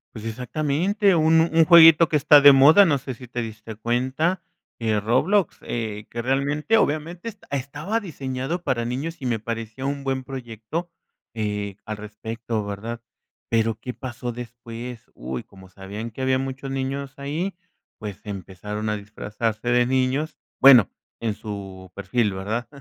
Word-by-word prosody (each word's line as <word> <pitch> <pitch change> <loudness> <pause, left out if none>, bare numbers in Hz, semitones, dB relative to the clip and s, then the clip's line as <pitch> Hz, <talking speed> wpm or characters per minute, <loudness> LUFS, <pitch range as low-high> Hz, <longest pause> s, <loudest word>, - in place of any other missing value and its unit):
Pues, 110 -1 -8
exactamente, 155 - +1
uno 160 +1 +4
un 165 0 +5
jueguito 165 -1 +8
que - - 0
está 145 +1 +7
de 145 0 +10
moda, 145 +9 +7
no 150 -6 +3
sé 130 0 -6
si 125 +1 -12
te 120 +1 -4
diste 110 -1 -7
cuenta, 130 - 0 0.4
eh, 110 -2 +1
Roblox, 160 - +1
eh, 110 -3 -4
que 120 - -4
realmente 140 - +1
obviamente 170 +5 -1 0.2
estaba 145 - -2
diseñado 140 - -4
para 125 -6 0
niños 145 +8 -3
y - - -5
me 120 -3 0
parecía 115 +3 -5
un 140 0 -2
buen 135 -1 -1
proyecto, 130 - -6 0.4
eh, 105 -3 -3
al 110 -1 -5
respecto, 110 +1 -5
¿verdad? 110 +4 -5 0.5
Pero, 115 -1 +2
¿qué 125 - -6
pasó 125 -1 -6
después? 120 0 -9
Uy, 65 +1 -5
como 95 -1 -16
sabían 100 +4 -7
que 120 - -8
habían 130 0 +2
muchos 135 0 -5
niños 135 +1 -3
ahí, 155 +8 -3 0.5
pues 105 -3 -6
empezaron 105 +2 -5
a 105 - -1
disfrazarse 110 +2 -4
de 120 0 +4
niños, 130 +4 0 0.2
bueno, 125 -7 +8 0.3
en 115 -2 -1
su 95 -3 -8
perfil, 105 +1 0
¿verdad? 110 +5 -3
125 Hz, 155 wpm, -23 LUFS, 110-145 Hz, 0.5 s, de